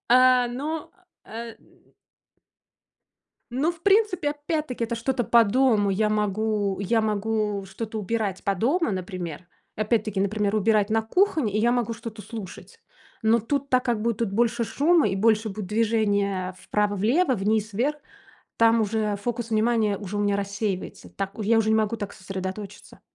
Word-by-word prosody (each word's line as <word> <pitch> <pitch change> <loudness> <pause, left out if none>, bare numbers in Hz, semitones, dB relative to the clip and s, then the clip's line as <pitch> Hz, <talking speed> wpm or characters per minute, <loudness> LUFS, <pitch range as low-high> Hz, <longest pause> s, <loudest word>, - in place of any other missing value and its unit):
А, 255 0 +6
ну, 295 +6 -4 0.3
э, - - -18 0.3
м - - -27 1.6
Ну, 280 +8 +1
в 335 -1 -17
принципе, 395 -6 +3
опять-таки- 295 -4 -3
это 235 +1 -3
что-то 245 +2 -1
по 235 +1 +5
дому. 220 -2 +2
Я 210 +2 +1
могу 210 -1 0
я 220 +3 +1
могу 210 -1 -1
что-то 215 +3 -5
убирать 205 -2 -2
по 200 -1 +1
дому, 270 - +1
например. 180 -3 -5 0.3
Опять-таки, 215 -2 0
например, 205 +1 0
убирать 215 0 +2
на 220 +1 +2
кухне, 310 - +1
и 215 - +1
я 235 +2 +3
могу 240 -2 0
что-то 225 -1 -8
слушать. 220 - -9 0.4
Но 225 +1 +4
тут, 280 +5 -2
так 255 0 +2
как 235 -3 0
будет 230 -2 -1
больше 235 +2 +1
шума, 310 +4 +3
и 195 - -1
больше 220 +2 +2
будет 205 0 -5
движения 205 -4 0
вправо-влево, 210 - +1
вниз-вверх, 215 +6 0 0.6
там 230 0 +4
уже 215 -1 0
фокус 235 +2 -4
внимания 220 -2 +2
уже 205 0 -6
у - - 0
меня 205 -1 +1
рассеивается, 200 -1 -4
так 195 0 -4
я 225 +1 +2
уже 220 - +1
не 220 - +4
могу 220 +1 +1
так 205 -2 -5
сосредоточиться. 190 +1 -7
220 Hz, 155 wpm, -25 LUFS, 205-240 Hz, 1.6 s, А